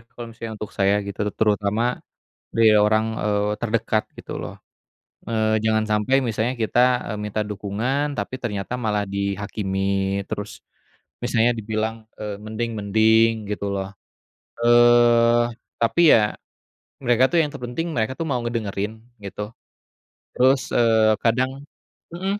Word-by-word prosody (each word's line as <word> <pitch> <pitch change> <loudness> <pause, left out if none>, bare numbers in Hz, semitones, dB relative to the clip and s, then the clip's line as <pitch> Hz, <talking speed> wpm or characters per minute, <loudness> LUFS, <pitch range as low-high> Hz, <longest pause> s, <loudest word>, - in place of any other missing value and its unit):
kalau 120 -1 -8
misalnya 115 0 -7
untuk 105 - -7
saya 100 +1 +3
gitu 100 - -7 0.2
terutama, 105 +3 +1 0.6
dari 115 -1 +5
orang, 110 +1 +3
eee, 105 0 0
terdekat 110 -1 0
gitu - - -8
loh, - - -7 0.7
eee, 110 -1 +1
jangan 110 0 +2
sampai 105 +5 +2
misalnya 115 +1 -1
kita, 115 +2 +1 0.3
eee, - - -4
minta 105 +1 -2
dukungan 110 +9 -2
tapi 100 +5 -3
ternyata 105 0 -3
malah 105 -3 0
dihakimi 100 0 -2
terus, 105 +1 -6 0.6
misalnya 120 0 +2
dibilang, 110 +1 -2 0.2
eee, 105 -2 -4
"mending 110 +2 -3
mending" 110 +2 +4 0.2
gitu 100 -1 -3
loh, 95 +1 -4 0.7
eee, 120 0 +5 0.4
tapi 145 +9 +3
ya, 105 -2 +2 0.7
mereka 120 +1 +3
tuh 170 - +2
yang 150 - -1
terpenting 130 +5 -4
mereka 110 +3 0
tuh 165 - -2
mau 125 -4 0
ngedengerin 110 -2 -3 0.2
gitu, 105 +2 -6 0.8
terus, 130 +1 +3
eee, 110 -2 +4
kadang 125 +3 +1 0.6
mhm, 195 +4 -2
110 Hz, 130 wpm, -22 LUFS, 105-120 Hz, 0.8 s, dari